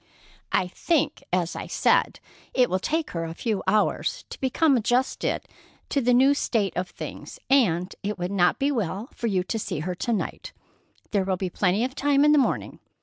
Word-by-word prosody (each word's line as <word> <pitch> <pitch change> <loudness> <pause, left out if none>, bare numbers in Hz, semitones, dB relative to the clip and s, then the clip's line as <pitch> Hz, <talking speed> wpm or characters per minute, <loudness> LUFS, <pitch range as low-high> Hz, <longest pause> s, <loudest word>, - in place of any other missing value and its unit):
"I 180 - +2
think, 310 - 0
as 175 -2 0
I - - -5
said, - - +2 0.4
it 250 -5 +3
will 185 - +1
take 315 - -1
her 165 -1 -3
a 165 0 -5
few 215 -2 -1
hours 210 +2 +1
to - - -8
become 275 +3 +3
adjusted 245 +3 0 0.4
to 280 - +1
the 250 0 +2
new 265 +3 +5
state 220 -8 0
of 180 0 -2
things, - - -8
and 185 -9 +3
it 205 +1 -3
would 180 +1 -3
not 180 -3 +3
be 280 +1 +1
well 220 - -2
for 235 - -3
you 190 -4 +1
to 225 +4 -3
see 155 - -3
her 180 +3 -2
to 235 +7 -3
night. 220 - -3 0.6
There 200 -2 +2
will 190 -1 -1
be 185 -1 -3
plenty 195 +4 +1
of 260 +1 -2
time 285 0 +3
in 300 - +6
the 300 - +6
morning. 265 - -1
215 Hz, 200 wpm, -25 LUFS, 185-265 Hz, 0.6 s, in